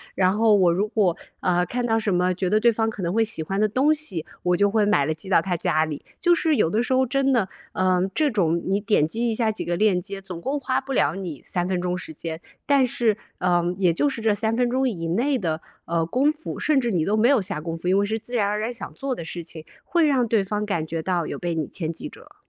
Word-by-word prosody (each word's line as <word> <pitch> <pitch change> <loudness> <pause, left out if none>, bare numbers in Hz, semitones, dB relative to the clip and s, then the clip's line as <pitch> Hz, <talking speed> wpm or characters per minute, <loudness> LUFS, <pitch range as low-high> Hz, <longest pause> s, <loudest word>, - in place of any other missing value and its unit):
然 185 +1 +2
后 220 -1 +4
我 180 -4 +4
如 200 +4 0
果， 205 -6 +1 0.3
呃， 180 -1 +2
看 240 +7 -2
到 225 -1 +2
什 210 - -1
么 180 +1 +2
觉 180 0 -2
得 215 +1 +3
对 235 +1 +4
方 225 0 0
可 200 -4 -6
能 170 +2 -1
会 225 0 +3
喜 215 -7 -2
欢 195 +5 -3
的 215 - +4
东 265 +8 +3
西， 255 - -2 0.2
我 180 0 +2
就 205 +2 +3
会 215 -2 +3
买 145 -9 +3
了 155 - 0
寄 160 +5 -8
到 190 - +5
他 185 -2 -2
家 155 -1 +1
里。 150 -2 -6 0.2
就 345 0 +4
是 325 -2 +2
有 165 - +3
的 215 +7 +1
时 260 - -1
候 260 0 +3
真 275 +2 +1
的， 230 -7 +2 0.3
嗯， 185 0 +1
这 300 -3 +2
种 170 -5 +1
你 195 +2 +1
点 205 -7 +2
击 235 +6 -1
一 225 - -1
下 220 -1 +1
几 215 - -5
个 175 - -1
链 185 -1 +2
接， 200 0 -7
总 180 -3 -8
共 280 +8 -2
花 260 -1 -1
不 270 0 -5
了 - - +2
你 175 -8 -6
3 175 0 -1
分 185 -1 -1
钟 180 0 -1
时 180 - -8
间， 160 +1 -6 0.2
但 280 -2 +4
是， 225 -3 +1 0.2
呃， 175 -1 +2 0.2
也 180 -4 +3
就 290 - +1
是 240 - -5
这 220 -1 +2
3 220 +2 0
分 245 0 +1
钟 260 +2 +1
以 165 -7 -4
内 255 +9 +1
的， 160 -6 -2 0.3
呃， 165 -1 0
功 265 - +2
夫 310 +1 -7
甚 300 -3 +2
至 240 -2 -1
你 175 -5 +1
都 205 +6 +1
没 220 +2 +4
有 265 -4 +4
下 180 -5 -3
功 165 +1 -5
夫， 175 +2 -6
因 190 - +4
为 200 - +2
是 220 +2 -1
自 230 +3 -7
然 205 - +2
而 210 +1 -1
然 225 +3 -2
想 240 - -6
做 275 -1 -3
的 170 - -6
事 170 +1 -6
情， 160 -1 -9 0.2
会 335 -3 +2
让 260 -4 +2
对 215 -3 +2
方 210 +1 -2
感 165 -6 -2
觉 165 0 -3
到 175 -2 -1
有 - - -4
被 175 -1 -3
你 155 -3 -2
牵 160 -3 -4
记 165 - -6
着。 - - -15
205 Hz, 295 characters per minute, -24 LUFS, 175-235 Hz, 0.3 s, 到